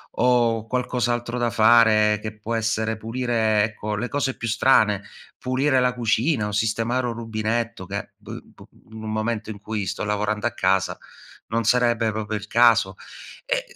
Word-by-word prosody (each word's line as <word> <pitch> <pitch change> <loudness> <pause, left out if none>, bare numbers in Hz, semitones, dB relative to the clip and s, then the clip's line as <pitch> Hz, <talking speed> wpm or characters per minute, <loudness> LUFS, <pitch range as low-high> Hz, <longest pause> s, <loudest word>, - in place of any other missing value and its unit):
o 120 -2 +2
qualcos'altro 120 -1 -1
da 120 -1 0
fare 110 -1 +5
che 110 0 -7
può 115 +2 -3
essere 110 0 -1
pulire, 115 -2 0
ecco, 105 -1 -3
le 120 +4 -2
cose 140 -2 -2
più 115 - -4
strane, 110 -3 +3 0.3
pulire 130 +1 +1
la 125 0 +2
cucina 120 +1 0
o - - -4
sistemare 115 +4 0
un 120 - -2
rubinetto 115 -2 -3
che, 100 +2 -6
boh, - - -9
b - - -22 0.3
in 110 0 -9
un 110 - -4
momento 110 0 -2
in 105 -2 -7
cui 105 -1 -4
sto 100 +3 -4
lavorando 105 +2 -1
a - - -3
casa, 95 -2 +1 0.5
non 115 0 -1
sarebbe 120 -2 +2
proprio 110 0 -3
il 105 0 -9
caso. 115 -4 +4 0.5
Ehm, - - 0
115 Hz, 165 wpm, -23 LUFS, 105-120 Hz, 0.5 s, fare